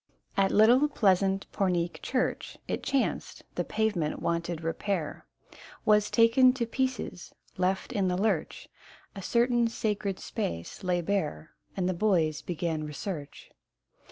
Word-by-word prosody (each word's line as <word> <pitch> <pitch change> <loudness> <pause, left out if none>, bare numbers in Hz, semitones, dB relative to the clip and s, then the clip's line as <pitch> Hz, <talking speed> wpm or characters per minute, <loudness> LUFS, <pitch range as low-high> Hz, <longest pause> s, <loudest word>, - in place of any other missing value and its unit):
At 195 -1 +3
little 240 +7 +6
pleasant 195 -7 +2
Pornic 175 -3 0
church, 255 -1 -2
It - - -2
chanced, 275 -2 -1
the - - -1
pavement 205 -9 -1
wanted 170 -1 -2
repair, 165 0 -3 0.6
Was 210 -1 +4
taken 245 +2 +5
to 250 -3 -1
pieces: 260 -6 -3 0.2
left 185 +1 -1
in 195 -2 +1
the 180 0 0
lurch, 195 -5 -1 0.5
A 195 - -6
certain 235 +3 +2
sacred 210 -4 -2
space 85 - -4
lay 180 -1 +1
bare, 165 - -2 0.3
And 180 -2 +1
the 185 - +1
boys 170 -6 +1
began 165 -2 -2
research. 150 0 -6
195 Hz, 130 wpm, -29 LUFS, 170-220 Hz, 0.6 s, little